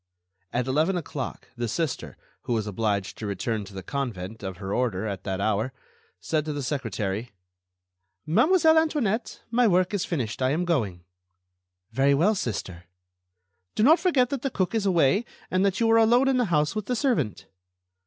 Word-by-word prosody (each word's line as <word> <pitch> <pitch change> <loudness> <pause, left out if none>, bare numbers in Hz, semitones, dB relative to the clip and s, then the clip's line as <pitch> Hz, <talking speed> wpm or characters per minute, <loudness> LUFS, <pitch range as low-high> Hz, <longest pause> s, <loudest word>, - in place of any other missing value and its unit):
At 125 0 0
eleven 155 +8 +1
o'clock, 145 -5 -5
the 120 -1 -2
Sister, 155 +4 -3 0.3
who 120 - -1
was 110 -2 0
obliged 100 -1 -2
to 110 - -4
return 105 +2 -2
to 100 - -13
the 95 - -6
convent 110 -7 -4
of 95 -3 -5
her 95 +1 -4
order 110 -5 0
at 100 -4 -4
that 95 -1 -2
hour, 110 +5 0 0.5
said 155 - -1
to 155 - -3
the 145 -1 -4
secretary: 115 -5 -3 0.9
"Mademoiselle 320 - +5
Antoinette, 250 -9 -1
my 240 0 +4
work 185 0 +2
is 200 - 0
finished; 130 -9 -3
I 130 - +3
am 165 +6 0
going." 105 - -1 0.9
"Very 135 +4 +3
well, 180 +10 +3
Sister." 95 - -4 0.9
"Do 215 - +2
not 315 +8 +6
forget 270 -9 +2
that 275 -3 -2
the 275 - -1
cook 185 -5 -1
is 215 -3 +1
away, 180 - +3 0.3
and 185 +1 +2
that 200 -1 +1
you 230 - +3
are 225 - +6
alone 240 +4 +4
in 265 - +2
the 245 - +2
house 150 -4 +1
with 215 -2 -3
the 250 - 0
servant." 140 - 0
145 Hz, 180 wpm, -26 LUFS, -, 0.9 s, not